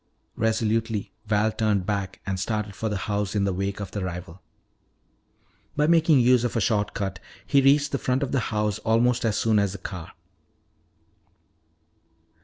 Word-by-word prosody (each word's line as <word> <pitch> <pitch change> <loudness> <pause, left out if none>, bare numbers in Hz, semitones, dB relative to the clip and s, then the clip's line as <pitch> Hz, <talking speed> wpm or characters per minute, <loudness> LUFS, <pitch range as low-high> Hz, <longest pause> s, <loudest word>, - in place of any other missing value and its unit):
Resolutely 110 -1 0 0.2
Val 105 +1 +2
turned 105 -4 0
back 100 -2 -3
and 95 -1 -2
started 105 0 -2
for 110 +3 -3
the 105 - -2
house 105 -1 -2
in 100 - +2
the 100 -1 0
wake 100 +2 -3
of 100 -2 -6
the 100 - -3
rival. 90 0 -6 1.3
By 150 - +2
making 160 -4 +5
use 125 0 +4
of 120 - -2
a - - +2
short 105 -1 0
cut, 95 -3 -3 0.3
he 140 - +4
reached 140 +2 +4
the 140 - -1
front 130 +2 0
of 135 - -3
the 135 - +2
house 105 -1 -1
almost 120 +2 +2
as 110 -2 +1
soon 110 -2 +3
as 100 -2 0
the - - -6
car. 90 -2 -8
105 Hz, 170 wpm, -25 LUFS, 100-120 Hz, 1.3 s, making